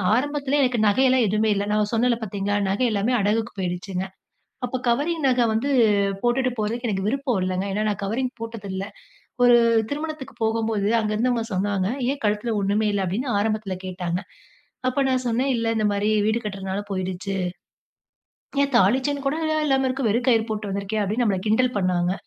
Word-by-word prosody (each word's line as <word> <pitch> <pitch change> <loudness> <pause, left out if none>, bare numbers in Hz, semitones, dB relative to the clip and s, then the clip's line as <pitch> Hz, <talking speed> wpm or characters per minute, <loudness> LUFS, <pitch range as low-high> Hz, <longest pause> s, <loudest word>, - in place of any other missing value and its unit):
ஆரம்பத்துல 285 +2 0
எனக்கு 250 -2 +1
நகையெல்லாம் 255 +3 +4
எதுவுமே 215 +2 +1
இல்லை. 200 0 -1
நான் 210 0 +1
சொன்னேன்ல 235 +1 +2
பாத்தீங்களா, 205 0 -2
நகை 205 +6 +1
எல்லாமே 215 +4 0
அடகுக்கு 215 +3 0
போயிடுச்சுங்க. 180 +1 -3 0.6
அப்போ 250 +1 -3
கவரிங் 290 +6 +1
நகை 250 -2 +3
வந்து 235 +6 0 0.5
போட்டுட்டு 250 +1 +2
போறதுக்கு 230 +3 -2
எனக்கு 195 -2 -1
விருப்பம் 260 -2 0
இல்லைங்க. 185 +1 -1
ஏன்னா 210 +2 0
நான் 205 -1 -3
கவரிங் 245 +6 -1
போட்டதில்ல. 200 -4 -5 0.6
ஒரு 245 0 +7 0.4
திருமணத்துக்கு 305 -1 -5
போகும்போது 220 -2 0
அங்கே 215 -1 -1
இருந்தவங்க 235 +1 +1
சொன்னாங்க, 190 0 0 0.2
"ஏன் 280 0 -5
கழுத்துல 210 +2 0
ஒண்ணுமே 205 +2 +1
இல்ல" 200 -1 0
அப்டீன்னு 220 +9 -2
ஆரம்பத்துல 215 -2 -1
கேட்டாங்க. 180 -1 -3 0.7
அப்போ 255 - -2
நான் 255 -1 0
சொன்னேன், 250 +4 +1
"இல்ல 230 -1 0
இந்த 215 -1 +2
மாரி 205 +1 0 0.2
வீடு 220 +2 +1
கட்றனால 195 -1 -3
போய்டுச்சு". 185 +1 -3 1.3
"ஏன் 280 -1 -2
தாலிச்செயின் 265 +7 +2
கூடயா 310 +2 0
இல்லாம 270 -1 +2
இருக்க? 265 +1 -2
வெறும் 240 +5 0
கயிறு 225 -2 +3
போட்டு 210 -2 -3
வந்துருக்கியா?" 200 +2 -2
அப்டீன்னு 220 +5 0
நம்மள 195 -4 +1
கிண்டல் 250 +3 +2
பண்ணாங்க. 180 -1 +1
220 Hz, 160 wpm, -23 LUFS, 200-255 Hz, 1.3 s, ஒரு